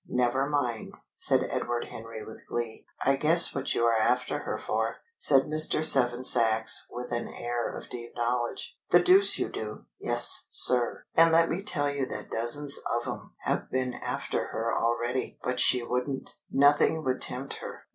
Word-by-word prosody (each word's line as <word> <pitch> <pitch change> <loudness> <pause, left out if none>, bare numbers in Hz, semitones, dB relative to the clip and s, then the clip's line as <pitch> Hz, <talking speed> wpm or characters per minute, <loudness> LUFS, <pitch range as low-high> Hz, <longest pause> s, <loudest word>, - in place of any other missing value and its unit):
"Never 125 +2 0
mind!" 125 -6 -3 0.2
said - - +3
Edward 120 0 -3
Henry 115 -1 -9
with 110 - -12
glee. 120 -2 -5 0.2
"I 135 - +3
guess 160 +5 +7
what 135 -1 -3
you 120 - +1
are 115 - +3
after 125 +3 0
her - - -5
for," - - -3 0.2
said 135 - +3
Mr. 155 0 +2
Seven 125 -4 +2
Sachs, 115 -3 +2
with 125 0 -8
an 120 - -2
air 120 -1 -4
of - - -9
deep 120 -1 -8
knowledge. 120 0 -3
"The 175 - +6
deuce 195 +3 +5
you - - -2
do!" 105 -1 -8
"Yes, - - +5
sir! 125 -2 +2
And 165 0 +5
let 165 0 +3
me 175 - -3
tell 145 -8 -1
you 140 -2 -3
that - - -8
dozens 140 +5 -2
of 120 0 -3
'em - - -8
have - - -3
been 130 -1 -2
after - - -4
her 115 +1 -3
already. 120 +2 -2
But 125 0 -3
she 125 -1 +3
wouldn't! 125 +3 -3 0.2
Nothing 145 +3 +3
would 130 -2 -2
tempt 130 +2 -4
her." - - -10
125 Hz, 175 wpm, -27 LUFS, 120-145 Hz, 0.2 s, guess